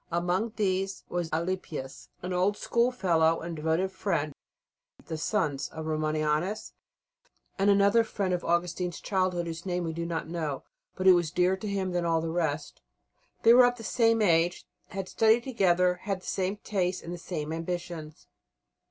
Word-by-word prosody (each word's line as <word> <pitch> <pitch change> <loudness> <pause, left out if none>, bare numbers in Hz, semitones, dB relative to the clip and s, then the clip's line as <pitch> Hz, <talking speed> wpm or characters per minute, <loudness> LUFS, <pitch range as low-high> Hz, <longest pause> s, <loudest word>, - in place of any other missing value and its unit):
Amongst 180 +7 0
these 195 -2 -1
was 175 -2 -2
Alypius, 160 -5 -4
an 180 0 -3
old 190 +3 +1
schoolfellow 180 -10 +2
and 170 - -5
a - - -5
devoted 165 +4 +1
friend; 170 -6 -1 0.7
the 160 - -4
sons 155 -4 -1
of 160 0 -7
Romanianus; 155 +4 -1 0.9
and 195 +1 +4
another 200 +3 +5
friend 200 -4 -2
of 175 - -1
Augustine's 175 +1 -1
childhood 185 -3 0
whose 165 0 -6
name 180 -2 -2
we 165 -1 -3
do 170 +1 -3
not 165 -2 -3
know, 160 -5 -3 0.3
but 185 - -4
who 190 - +9
was 175 -3 +2
dearer 180 +3 +2
to 210 - -6
him 195 -2 -1
than 175 -1 0
all 165 -1 +2
the 165 0 -3
rest. 155 -3 -2 0.6
They 230 - +8
were 250 0 +8
of 245 0 -1
the 225 - -9
same 225 -1 +3
age, 170 -1 +2 0.2
had 195 -1 -5
studied 225 +3 +3
together, 180 -7 +2
had 195 -2 -3
the - - -15
same 190 +2 -1
tastes, 185 -3 -2
and 170 - -6
the 175 - -6
same 160 -3 -4
ambitions. 165 -2 -5
180 Hz, 170 wpm, -28 LUFS, 165-195 Hz, 0.9 s, who